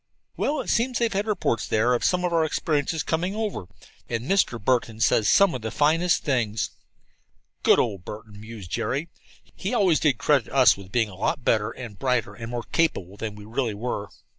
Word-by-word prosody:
"Well, 295 +1 0
it - - -7
seems 245 +2 +1
they've 235 -2 0
had 200 +2 -1
reports 190 - 0
there 110 +3 +2
of 120 - 0
some 180 -1 +2
of 175 - -1
our 165 -1 +3
experiences 155 0 -1
coming 180 +5 -1
over, 215 - -3 0.4
and 115 -1 -2
Mr. 180 -9 +1
Burton 115 -1 0
says 110 -1 +3
some 200 -3 +5
of 125 - -4
the 110 - -3
finest 165 +7 +2
things." 110 -8 0 0.9
"Good - - +5
old 100 -6 -1
Burton!" 105 0 -9
mused 110 -5 -10
Jerry. 140 - -2 0.5
"He - - -3
always 190 -8 +3
did 145 -7 +2
credit 140 -4 +1
us 130 -1 +6
with 95 -1 -12
being 115 -2 +1
a - - -12
lot 120 +7 -2
better 110 -1 +2
and 115 -4 -9
brighter 125 -6 0
and 115 +1 -8
more 120 -1 -4
capable 100 - -1
than 105 0 -5
we 105 0 -11
really 115 0 -2
were." 105 -2 -4
125 Hz, 195 wpm, -25 LUFS, 110-165 Hz, 0.9 s, us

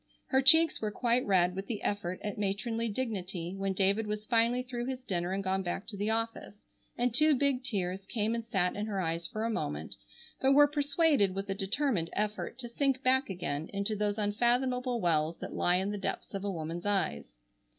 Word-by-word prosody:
Her 265 - +4
cheeks 320 +4 +6
were 215 - 0
quite 240 +3 +1
red 180 -2 +3
with 195 +1 -5
the 220 -4 -4
effort 185 -3 -2
at 205 -1 -4
matronly 225 +3 -1
dignity 190 -7 -3
when 195 0 -1
David 200 +3 +1
was 210 0 -3
finally 235 +2 +2
through 245 -1 -4
his 260 -1 -4
dinner 175 -5 -2
and 195 +1 -2
gone 190 0 0
back 185 +2 -3
to 215 - -6
the 205 +2 -1
office, 225 -2 -3 0.3
and 245 -1 +1
two 305 +4 +5
big 270 -1 +1
tears 195 -5 -3
came 220 -1 -1
and 230 0 -2
sat 195 -5 0
in 210 +1 -3
her 200 -3 -2
eyes 165 -1 -2
for 215 - -4
a - - 0
moment, 75 - -4 0.4
but 270 +1 +4
were 290 +1 +8
persuaded 290 - +2
with 195 0 -3
a - - +1
determined 195 - 0
effort 210 +2 -2
to 250 -2 -6
sink 270 +2 0
back 260 0 +3
again 165 -4 -3
into 200 +2 -1
those 205 0 -1
unfathomable 245 +4 +1
wells 165 -3 +1
that - - -7
lie 175 - +2
in 190 +2 0
the 205 - -4
depths 195 - -4
of 195 0 -4
a 205 - -1
woman's 170 +1 -4
eyes. 190 - -1
210 Hz, 205 wpm, -31 LUFS, 190-245 Hz, 0.4 s, were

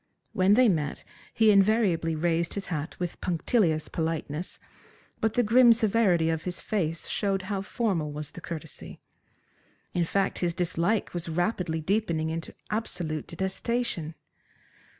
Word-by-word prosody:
When 190 +2 +4
they 250 +1 +6
met 155 -8 0 0.3
he 220 -1 +4
invariably 195 -5 +3
raised 165 +1 0
his 200 -1 -3
hat 155 +1 -4
with 175 -2 -4
punctilious 170 -2 +1
politeness, 160 0 -3 0.6
but 220 0 0
the 245 - +4
grim 235 +2 +7
severity 205 -7 +2
of 160 -1 -2
his 180 0 -4
face 165 -6 -2
showed 195 -2 -1
how 195 0 -2
formal 195 -8 -1
was 150 0 -6
the 180 - -10
courtesy. 160 -2 -8 0.9
In 175 -1 +1
fact, 195 +3 0
his 170 -2 0
dislike 180 +4 0
was 170 -1 -4
rapidly 175 -1 -1
deepening 165 -3 0
into 165 0 -5 0.2
absolute 170 -8 -2
detestation. 190 -2 -2
175 Hz, 135 wpm, -27 LUFS, 160-210 Hz, 0.9 s, grim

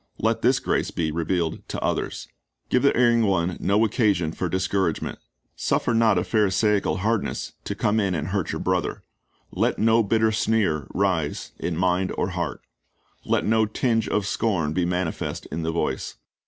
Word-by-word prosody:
Let - - 0
this - - +3
grace - - 0
be 80 -2 -2
revealed 85 0 -1
to - - -3
others. - - -2 0.4
Give 125 - +3
the 140 - +3
erring 120 -1 +4
one 90 -2 +1
no 105 +3 +3
occasion 100 -7 +1
for 90 +2 -3
discouragement. 95 -1 -1 0.4
Suffer - - 0
not 115 -3 +4
a - - +2
Pharisaical 105 -1 +2
hardness 115 -1 -1
to - - -3
come 105 +2 +1
in 100 -3 0
and 80 +2 -3
hurt 95 -3 -1
your - - -4
brother. 90 -1 -1 0.5
Let - - 0
no 115 +1 +4
bitter 110 +1 +2
sneer 105 - +1
rise 90 -6 -1
in 85 -2 -2
mind 90 +1 +1
or 90 - 0
heart. 85 -7 -3 0.6
Let - - +1
no 110 0 +3
tinge 115 +1 0
of 105 -2 0
scorn 95 -9 0
be 90 0 +1
manifest 90 -1 -2
in 85 - -3
the 80 0 -1
voice. 85 - -2
95 Hz, 170 wpm, -24 LUFS, 85-110 Hz, 0.6 s, erring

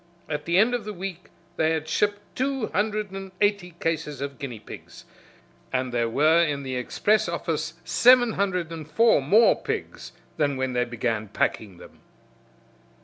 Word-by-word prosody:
At 150 -1 -4
the 170 +1 +2
end 220 +5 +4
of 240 -3 -1
the 210 0 -6
week 180 -1 -7 0.3
they 160 0 +2
had 160 -1 -3
shipped 205 +5 0
two 265 -2 -1
hundred 210 -1 -1
and 195 0 -7
eighty 200 -4 0
cases 160 -3 -2
of 140 -1 -5
guinea 125 -5 -5
pigs, - - -12 0.7
and 130 -1 -1
there 120 -1 +1
were 155 +7 +4
in 145 -3 -2
the 130 -1 -4
express 205 +12 +1
office - - -3
seven 245 -1 +5
hundred 180 -4 -1
and 155 -2 -7
four 225 +1 +4
more 205 +12 +5
pigs - - -5 0.2
than 145 -3 +1
when 130 -1 -1
they 125 0 +1
began 115 -2 -2
packing 100 -1 -2
them. - - -15
165 Hz, 165 wpm, -25 LUFS, 135-205 Hz, 0.7 s, seven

